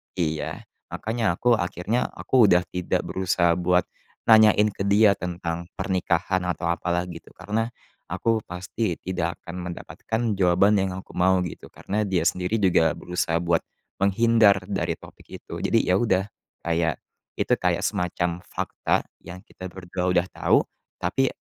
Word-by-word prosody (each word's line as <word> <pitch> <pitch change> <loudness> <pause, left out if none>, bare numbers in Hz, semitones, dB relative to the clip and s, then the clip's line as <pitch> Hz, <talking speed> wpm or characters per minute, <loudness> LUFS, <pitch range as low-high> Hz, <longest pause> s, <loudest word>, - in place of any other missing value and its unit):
Iya, 80 -2 -2 0.2
makanya 110 -5 -1
aku 120 - -4
akhirnya 90 +6 -1
aku 125 -5 +3
udah 90 -2 +4
tidak 90 -1 -1
berusaha 90 -2 +1
buat 90 0 +3 0.4
nanyain 110 -1 +6
ke 100 0 -3
dia 105 +1 +6
tentang 85 -2 -4
pernikahan 90 0 0
atau 90 -1 -1
apa, 85 - -4
lah, 85 - 0
gitu, 85 -2 -10
karena 110 +2 -2 0.4
aku 110 +6 0
pasti 90 +2 -3
tidak 85 -2 -2
akan 85 - -8
mendapatkan 110 +5 -4 0.2
jawaban 95 +3 +4
yang 95 -1 -1
aku 95 - -9
mau, 90 0 +2
gitu, 85 - -7
karena 105 +1 -3
dia 90 -4 +1
sendiri 90 +5 0
juga 85 -3 +3
berusaha 90 -2 -2
buat 85 -1 +2 0.4
menghindar 100 0 +4
dari 95 - -1
topik - - -16 0.2
itu. - - -10
Jadi, - - +2
ya, 90 +1 +2
udah, 95 -5 +2 0.4
kayak, 85 -1 +1 0.4
itu - - +1
kayak - - 0
semacam 90 -1 -1
fakta - - -1 0.2
yang 90 +2 -11
kita 95 - -9
berdua 90 0 -4
udah 90 -1 +3
tau - - +3 0.3
tapi 135 0 0
90 Hz, 150 wpm, -24 LUFS, 85-100 Hz, 0.4 s, nanyain